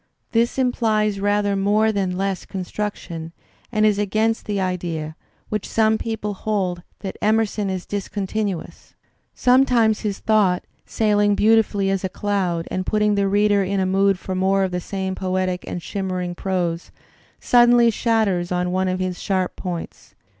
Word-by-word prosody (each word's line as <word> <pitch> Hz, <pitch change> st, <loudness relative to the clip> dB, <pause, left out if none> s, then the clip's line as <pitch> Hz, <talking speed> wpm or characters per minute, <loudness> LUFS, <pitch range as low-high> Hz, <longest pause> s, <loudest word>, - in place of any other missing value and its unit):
This 235 Hz, +2 st, +1 dB
implies 220 Hz, -5 st, +1 dB
rather 205 Hz, 0 st, +1 dB
more 210 Hz, +3 st, +2 dB
than 190 Hz, -3 st, -1 dB
less 195 Hz, -1 st, -2 dB
construction 180 Hz, -4 st, -5 dB, 0.4 s
and 215 Hz, -2 st, +2 dB
is 210 Hz, -1 st, +3 dB
against 215 Hz, +2 st, 0 dB
the 205 Hz, -1 st, -1 dB
idea, 170 Hz, -4 st, -3 dB, 0.3 s
which 215 Hz, -2 st, -3 dB
some 220 Hz, 0 st, +2 dB
people 220 Hz, -2 st, -3 dB
hold, 190 Hz, -3 st, -2 dB, 0.2 s
that 195 Hz, -2 st, -5 dB
Emerson 215 Hz, -1 st, +1 dB
is 185 Hz, -1 st, -3 dB
discontinuous. 200 Hz, -1 st, -4 dB, 0.4 s
Sometimes 245 Hz, -4 st, +3 dB
his 205 Hz, -2 st, -3 dB
thought, 205 Hz, -5 st, +2 dB, 0.2 s
sailing 205 Hz, -2 st, +2 dB
beautifully 210 Hz, -2 st, +3 dB
as 195 Hz, -1 st, -1 dB
a 190 Hz, -, -1 dB
cloud 185 Hz, -4 st, -1 dB
and 185 Hz, -, -1 dB
putting 210 Hz, +2 st, +1 dB
the 200 Hz, -1 st, +1 dB
reader 205 Hz, 0 st, +3 dB
in 195 Hz, +1 st, -1 dB
a 190 Hz, -, +1 dB
mood 195 Hz, +1 st, +2 dB
for 190 Hz, -, -5 dB
more 190 Hz, +1 st, +2 dB
of 190 Hz, -, -1 dB
the 180 Hz, 0 st, -2 dB
same 190 Hz, 0 st, -3 dB
poetic 185 Hz, -1 st, -2 dB
and 175 Hz, -, -5 dB
shimmering 185 Hz, -2 st, -3 dB
prose, 175 Hz, -2 st, -2 dB, 0.5 s
suddenly 240 Hz, -1 st, +5 dB
shatters 205 Hz, -6 st, 0 dB
on 180 Hz, 0 st, 0 dB
one 185 Hz, +1 st, 0 dB
of 185 Hz, 0 st, -1 dB
his 185 Hz, -1 st, -3 dB
sharp 185 Hz, -2 st, -1 dB
points. 175 Hz, -3 st, -7 dB
200 Hz, 155 wpm, -22 LUFS, 185-215 Hz, 0.5 s, suddenly